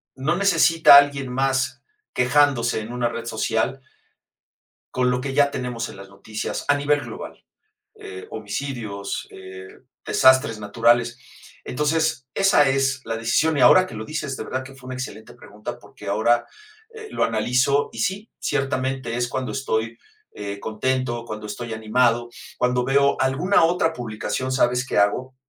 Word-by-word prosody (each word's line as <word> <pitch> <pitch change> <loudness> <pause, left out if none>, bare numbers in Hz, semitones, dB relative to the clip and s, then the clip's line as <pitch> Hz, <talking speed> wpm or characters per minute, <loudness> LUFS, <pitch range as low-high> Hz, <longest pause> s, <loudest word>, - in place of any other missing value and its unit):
no 150 +6 -1
necesita 165 -5 +6
alguien 140 -2 +3
más 135 0 -1 0.3
quejándose 125 -3 +2
en 110 +2 -7
una 120 -1 0
red 115 0 -6
social 115 +3 -1 1.1
con 125 0 +1
lo 125 0 -1
que 135 0 -4
ya 140 0 +3
tenemos 125 -3 -4
en - - -11
las 95 0 -11
noticias 105 +2 -5
a 145 - +4
nivel 145 0 +1
global, - - -9 0.5
eh, 410 -1 -10
homicidios, 110 -8 -5
eh, 95 0 -10 0.4
desastres 130 -3 +4
naturales. 120 +3 +2 0.5
Entonces, 150 -2 0
esa 170 -7 +4
es 135 -1 +1
la 115 0 -2
decisión. 150 +8 +1
Y 135 - +2
ahora 185 0 +7
que - - -11
lo 110 0 -6
dices, 155 -1 -4
de - - -6
verdad 130 0 -3
que 135 +1 -12
fue 130 -1 -13
una 130 - -5
excelente 110 -4 -7
pregunta, 105 +1 -9
porque - - -14
ahora, 110 +4 +2 0.5
eh, 440 -1 -9
lo - - +1
analizo 125 +5 +1
y - - -7
sí, 205 +1 -2
ciertamente, 135 -3 -2
es 120 0 -1
cuando 130 +2 -3
estoy, 115 -4 -2 0.3
eh, 100 -1 -6
contento, 120 +2 -2
cuando 110 -2 -7
estoy 115 +3 -6
animado, 120 +2 +1 0.3
cuando 125 0 +1
veo 140 +2 +3
alguna 150 +8 +3
otra 165 -1 +2
publicación, 120 +2 -4
¿sabes 125 -1 +1
qué - - -1
hago? 125 +6 +1
130 Hz, 155 wpm, -23 LUFS, 115-140 Hz, 1.1 s, ahora